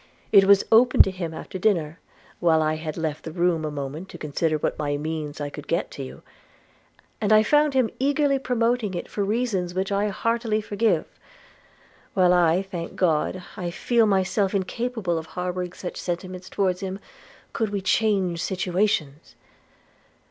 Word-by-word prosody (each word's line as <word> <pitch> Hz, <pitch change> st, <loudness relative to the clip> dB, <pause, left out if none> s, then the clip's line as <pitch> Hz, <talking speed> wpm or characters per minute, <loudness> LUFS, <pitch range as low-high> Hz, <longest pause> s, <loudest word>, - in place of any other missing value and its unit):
It 195 Hz, -2 st, +7 dB
was 200 Hz, 0 st, +5 dB
opened 245 Hz, +3 st, +7 dB
to 195 Hz, -, -3 dB
him 180 Hz, -3 st, -5 dB
after 165 Hz, +3 st, -7 dB
dinner, 170 Hz, -6 st, +1 dB, 0.4 s
while 165 Hz, -2 st, +4 dB
I 155 Hz, 0 st, +1 dB
had 155 Hz, -1 st, -5 dB
left 160 Hz, -2 st, -3 dB
the 160 Hz, -, -6 dB
room 170 Hz, -1 st, +1 dB
a 155 Hz, -, -2 dB
moment 145 Hz, +5 st, -6 dB
to -, -, -9 dB
consider 155 Hz, +1 st, -1 dB
by -, -, -3 dB
what 145 Hz, -1 st, -3 dB
means 155 Hz, -1 st, -4 dB
I 145 Hz, -1 st, -4 dB
could -, -, -9 dB
get -, -, -1 dB
to -, -, -7 dB
you; 65 Hz, +1 st, -10 dB, 1.0 s
and 210 Hz, 0 st, +1 dB
I 215 Hz, 0 st, +7 dB
found 295 Hz, +4 st, +3 dB
him 255 Hz, -4 st, +2 dB
eagerly 280 Hz, 0 st, +2 dB
promoting 235 Hz, -5 st, 0 dB
it 175 Hz, -, -4 dB
for 205 Hz, -, -2 dB
reasons 200 Hz, -5 st, -1 dB
which 190 Hz, +1 st, -1 dB
I 200 Hz, +1 st, +1 dB
heartily 225 Hz, +1 st, 0 dB
forgive, 215 Hz, +1 st, 0 dB, 1.1 s
while 180 Hz, -1 st, +5 dB
I 175 Hz, +1 st, +3 dB
thank 175 Hz, -4 st, -6 dB
God 180 Hz, +1 st, 0 dB
I 175 Hz, -1 st, -3 dB
feel 230 Hz, +6 st, +2 dB
myself 195 Hz, 0 st, +1 dB
incapable 200 Hz, -3 st, -1 dB
of 160 Hz, -, -9 dB
harbouring 180 Hz, 0 st, -3 dB
such 180 Hz, -, -7 dB
sentiments 180 Hz, +1 st, -5 dB
towards 185 Hz, -2 st, 0 dB
him, 190 Hz, -1 st, -4 dB, 0.6 s
could 220 Hz, -2 st, -1 dB
we 200 Hz, -1 st, -2 dB
change 190 Hz, -3 st, +1 dB
situations. 180 Hz, -5 st, -1 dB
185 Hz, 165 wpm, -24 LUFS, 165-215 Hz, 1.1 s, It